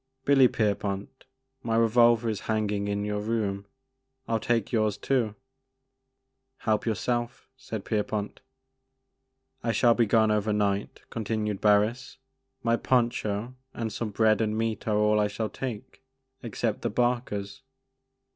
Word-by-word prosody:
Billy 135 -2 +6
Pierpont, 100 0 -2 0.4
my 115 -2 -1
revolver 115 0 +4
is 110 -3 -1
hanging 105 -2 0
in 100 0 -1
your 105 0 -2
room; 105 -2 -2 0.6
I - - -5
'11 115 -1 -1
take 115 -4 +1
yours 110 -3 +1
too 120 -6 0 0.4
" 130 0 -53
" 130 0 -53
Help 110 0 +1
yourself,'* 120 +2 -2
said 115 -6 -7
Pierpont. 105 -1 -2 1.2
I 115 - +1
shall 120 +1 +4
be 115 -1 +2
gone 110 0 +4
over 105 0 +1
night," 100 -1 -1
continued 110 -2 -2
Barris; 110 +5 +2 0.2
" 130 0 -48
my 115 0 +2
poncho 120 -2 0 0.2
and 110 -2 -3
some 115 - -3
bread 110 +1 +3
and 110 -1 0
meat 115 -2 -2
are 105 -1 +2
all 105 0 +3
I 105 - +3
shall 105 +1 -3
take 130 -2 -6 0.4
except 115 -2 -2
the - - -1
'barkers.' 120 -3 -1
110 Hz, 145 wpm, -27 LUFS, 105-120 Hz, 1.2 s, Billy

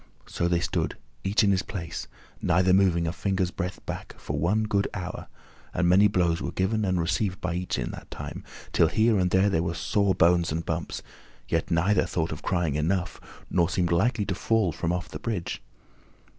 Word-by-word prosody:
So 85 - -1
they 85 -1 +1
stood, - - -1 0.3
each 100 +3 +2
in 100 - +4
his 95 -1 +2
place, 85 -5 -6 0.3
neither 90 +1 +3
moving 90 -3 +4
a 80 - -1
finger's 95 -2 -1
breadth 90 -1 -5
back, - - -6
for 70 +1 -4
one 100 +8 +2
good 100 -2 +1
hour, 90 -1 -5 0.5
and 90 0 +2
many 95 +4 +6
blows 85 -4 +1
were - - -3
given 105 +4 0
and 95 -2 +1
received 90 +3 0
by 90 -1 -2
each 90 +1 -2
in - - -2
that - - -10
time, - - -7 0.3
till - - +5
here 110 -1 +3
and 90 -1 +2
there 95 -2 +3
were 85 0 -2
sore 100 +2 +1
bones 85 0 +4
and 80 +1 -2
bumps, 85 0 -3 0.4
yet - - 0
neither 90 +4 +2
thought 80 -1 -1
of 75 - -5
crying 85 -6 0
"Enough," 90 +5 -1 0.3
nor 85 -2 +3
seemed 90 -2 0
likely 105 +5 +2
to 95 - -1
fall 110 -1 +1
from 85 +2 -2
off 90 0 -2
the - - -7
bridge. 105 -7 -3
90 Hz, 195 wpm, -27 LUFS, 85-100 Hz, 0.5 s, many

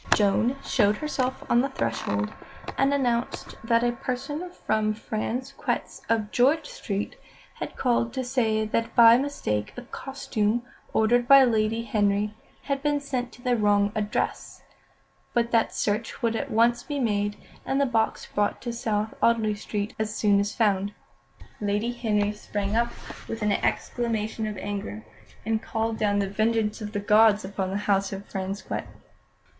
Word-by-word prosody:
Joan 220 +5 +2
showed 210 -4 +2
herself 260 -4 -2
on 235 - +4
the 275 - 0
threshold, 115 - -2 0.4
and 275 +1 +3
announced 245 -4 -1
that 230 +1 +3
a 240 - +3
person 275 +8 -4
from 215 -10 -1
Frasquet's, 235 +5 -3
of 220 -2 +1
George 285 +6 +3
Street, 200 0 -4 0.4
had - - -5
called 235 -2 +1
to 260 - -2
say 225 -4 +1
that 230 +2 -1
by 230 -1 +9
mistake 105 - -2
a 245 - -6
costume 240 -4 -2 0.3
ordered 240 +2 +3
by 275 0 +9
Lady 225 -1 +1
Henry 205 -1 +1 0.3
had 275 -1 -1
been 295 0 +1
sent 255 -3 -3
to 245 - -15
the 250 -1 +2
wrong 205 -2 +3
address, 210 -1 -2 0.7
but 235 0 +2
that 230 -1 +3
search 220 +4 -2
would 230 -1 +2
at - - -2
once 235 +2 +3
be 290 +3 -4
made, 205 -4 0 0.3
and 270 - 0
the 280 - +4
box 225 -3 0
brought 205 0 +1
to 240 -2 -3
South 220 -2 -1
Audley 225 -2 +3
Street 205 0 -4
as 215 0 -2
soon 205 -2 +3
as 205 +1 -1
found. 205 -2 +1 0.7
Lady 210 +3 0
Henry 210 -4 0
sprang 205 0 -3
up 235 +1 +2 0.4
with 225 -1 -4
an 210 - +2
exclamation 220 0 -1
of 210 -2 -5
anger, 205 +2 -5 0.4
and 220 0 0
called 225 0 -2
down 205 -1 +2
the 200 -1 +1
vengeance 215 +2 0
of 210 -1 -5
the 205 - -1
gods 210 0 +5
upon 190 -1 -3
the 195 - -1
house 195 -1 +2
of 195 0 -6
Frasquet. 195 +1 -4
220 Hz, 160 wpm, -26 LUFS, 205-240 Hz, 0.7 s, by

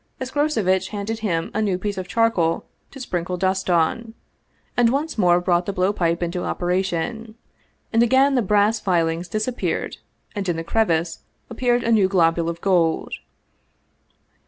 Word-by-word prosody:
Escroceviteh 245 -9 0
handed 215 +2 -4
him 170 -7 -2
a 215 - 0
new 200 -4 0
piece 205 +2 -3
of 185 -1 -5
charcoal 195 -8 +1 0.2
to 275 - -12
sprinkle 180 -7 -3
dust 190 +1 -1
on, 180 +7 0 0.6
and 240 -1 +4
once 285 +6 -1
more 175 -4 +4
brought 175 -1 +1
the - - 0
blow 185 +2 +1
pipe 170 -2 0
into 175 +1 -3
operation. 190 +5 -2 0.6
And 225 - +4
again 265 +4 +4
the 255 - +3
brass 210 +1 +2
filings 170 -2 0
disappeared 215 +6 -2 0.4
and 200 -3 -3
in 175 - 0
the 165 - -4
crevice 170 -4 0 0.3
appeared 240 +1 +1
a 230 - 0
new 210 -4 +4
globule 170 -3 +2
of 170 0 -6
gold. 175 -4 +1
190 Hz, 155 wpm, -22 LUFS, 175-225 Hz, 0.6 s, and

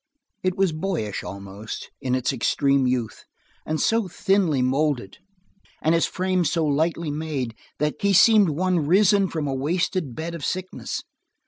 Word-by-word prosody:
It 185 -1 -1
was 190 -3 +3
boyish, 155 - -3
almost, 100 +2 -8
in 130 -1 0
its 130 +2 0
extreme 135 +1 +2
youth, 125 -3 -2 0.4
and 155 0 -1
so 225 -3 +2
thinly 175 -7 +1
molded, 130 -5 0 0.6
and 160 - +2
his 165 - +3
frame 185 -1 0
so 165 +1 +1
lightly 160 +2 0
made, 145 -6 -3 0.2
that 150 +1 -2
he 200 - +3
seemed 205 0 +6
one 170 0 0
risen 195 +2 +4
from 160 -3 -3
a 135 - -1
wasting 160 - -1
bed 165 +6 -5
of 165 -4 -7
sickness. 185 0 -4
155 Hz, 150 wpm, -24 LUFS, 135-185 Hz, 0.6 s, seemed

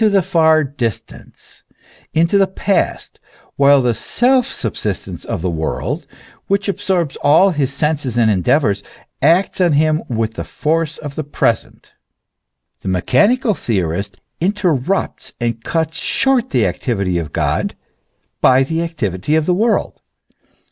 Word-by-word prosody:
191 200 -3 +4
far 160 -2 +4
distance, 130 -6 -6 0.5
into 170 +5 +2
the 195 - +4
past, 190 +1 -2 0.4
while 140 -1 +5
the 120 -1 +2
self 250 - +2
subsistence - - -4
of 80 - -4
the 90 - 0
world, 80 -1 -3 0.4
which 200 +1 0
absorbs 190 -6 -1
all 165 +7 +4
his 145 -5 -1
senses 140 -4 -1
and 115 -2 +4
endeavours, 100 - +1 0.4
acts 170 +7 +2
on 175 -4 +3
him 155 +2 +2
with 115 -2 -1
the - - -5
force 160 0 -1
of 145 -2 -7
the 155 - -4
present. 120 -5 -2 0.9
The - - -9
mechanical 210 - +2
theorist 95 - -2 0.2
interrupts 185 -3 -1
and 115 -1 -2
cuts 160 +2 -2
short 260 -2 +1
the 120 -6 +2
activity 95 -1 -1
of 80 -3 -6
God - - -1 0.7
by 130 +1 +5
the 160 +4 -2
activity 145 - -2
of 160 -1 +2
the 180 - +2
world. 220 +5 0
150 Hz, 135 wpm, -17 LUFS, 115-180 Hz, 0.9 s, while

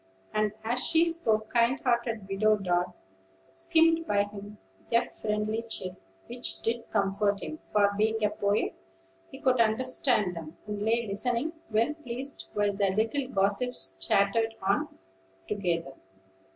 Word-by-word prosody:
And, 215 -1 +1
as 240 +3 0
she 330 0 +4
spoke, 220 -11 +1
kind 235 +3 +3
hearted 235 -4 0
Widow 210 +2 +3
Dart 180 -2 0 0.6
skimmed 330 -1 +3
by 205 -1 +3
him 205 0 -9 0.3
with 235 - +5
a - - -6
friendly 215 +1 -2
chirp, 205 -5 -3 0.3
which 240 +1 -2
did 230 0 -2
comfort 200 0 +1
him; 310 - -6
for, 205 -1 +2
being 220 +1 +1
a 210 - +1
poet, 205 0 0 0.6
he - - -11
could 255 -2 +3
understand 225 -3 +2
them, 165 0 -8
and 210 -1 -4
lay 230 +2 +1
listening, 240 +9 -1 0.2
well 230 +6 +2
pleased 270 -2 -4
while 205 -1 +2
the 200 0 +1
little 230 +6 0
gossips 200 - 0
chattered 225 +3 +2
on 195 +1 +1 0.6
together. 170 -8 -2
215 Hz, 140 wpm, -29 LUFS, 200-245 Hz, 0.6 s, with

